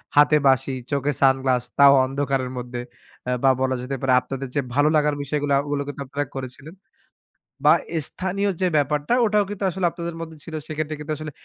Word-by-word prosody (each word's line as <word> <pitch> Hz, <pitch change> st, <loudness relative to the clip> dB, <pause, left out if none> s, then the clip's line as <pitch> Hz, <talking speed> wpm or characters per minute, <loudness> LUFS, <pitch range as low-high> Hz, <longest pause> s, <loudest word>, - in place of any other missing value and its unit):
হাতে 150 Hz, +1 st, +6 dB
বাঁশি, 130 Hz, 0 st, +2 dB, 0.2 s
চোখে 140 Hz, 0 st, 0 dB
সানগ্লাস, 130 Hz, -2 st, +3 dB, 0.2 s
তাও 140 Hz, 0 st, +9 dB
অন্ধকারের 135 Hz, -1 st, -2 dB
মধ্যে। 120 Hz, 0 st, -5 dB, 0.5 s
আ -, -, +1 dB
বা 135 Hz, -, +6 dB
বলা 130 Hz, 0 st, +1 dB
যেতে 130 Hz, +2 st, -4 dB
পারে, 130 Hz, -1 st, +2 dB
আপনাদের 135 Hz, +2 st, -5 dB
যে 145 Hz, -, +2 dB
ভালো 145 Hz, +2 st, +4 dB
লাগার 150 Hz, -1 st, +2 dB
বিষয়গুলা, 145 Hz, 0 st, 0 dB
ওগুলো 145 Hz, -1 st, -2 dB
কিন্তু 145 Hz, 0 st, -6 dB
আপনারা 145 Hz, +2 st, -3 dB
করেছিলেন। 135 Hz, +5 st, -8 dB, 0.9 s
বা -, -, +8 dB, 0.3 s
স্থানীয় 195 Hz, +2 st, -2 dB
যে 185 Hz, -, +3 dB
ব্যাপারটা, 145 Hz, -, 0 dB
ওটাও 210 Hz, -1 st, +3 dB
কিন্তু 205 Hz, -1 st, -5 dB
আসলে 185 Hz, 0 st, -2 dB
আপনাদের 170 Hz, -1 st, -6 dB
মধ্যে 160 Hz, -1 st, -8 dB
ছিল। 165 Hz, -, -10 dB
সেক্ষেত্রে 155 Hz, 0 st, -3 dB
কিন্তু 150 Hz, +1 st, -4 dB
আসলে 155 Hz, -1 st, -6 dB
145 Hz, 180 wpm, -23 LUFS, 135-155 Hz, 0.9 s, তাও